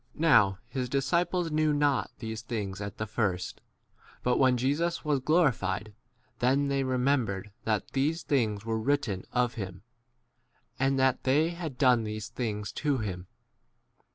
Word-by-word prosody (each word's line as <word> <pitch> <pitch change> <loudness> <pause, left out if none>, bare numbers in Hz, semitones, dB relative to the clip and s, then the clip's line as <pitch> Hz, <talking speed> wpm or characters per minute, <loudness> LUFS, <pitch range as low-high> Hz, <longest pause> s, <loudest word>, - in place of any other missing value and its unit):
Now 155 -9 +6
1 95 - -8
his 125 -1 -2
disciples 170 +5 +1
knew 155 0 +2
not 145 -2 +2
these 110 -1 -5
things 105 -4 -4
at 100 -1 -6
the 110 - -2
first; 100 -4 -2 0.6
but 125 0 +2
when 130 -2 +4
Jesus 150 +8 0
was 145 -2 +2
glorified, 120 - +1 0.5
then 135 +3 +2
they 140 -1 +1
remembered 125 -7 0
that 110 -2 0
these 150 +5 0
things 110 -7 0
were 110 -1 -1
written 115 -6 0
of 125 -1 +1
him, 95 -3 -6 1.0
and 135 +1 +2
that 130 -1 +2
they 150 +5 +3
had 170 -6 -6
done 125 -4 +4
these 110 0 -5
l? - - -38
things 105 -5 -3
to 145 +2 0
him. 95 -5 -4
125 Hz, 155 wpm, -29 LUFS, 110-145 Hz, 1.0 s, Now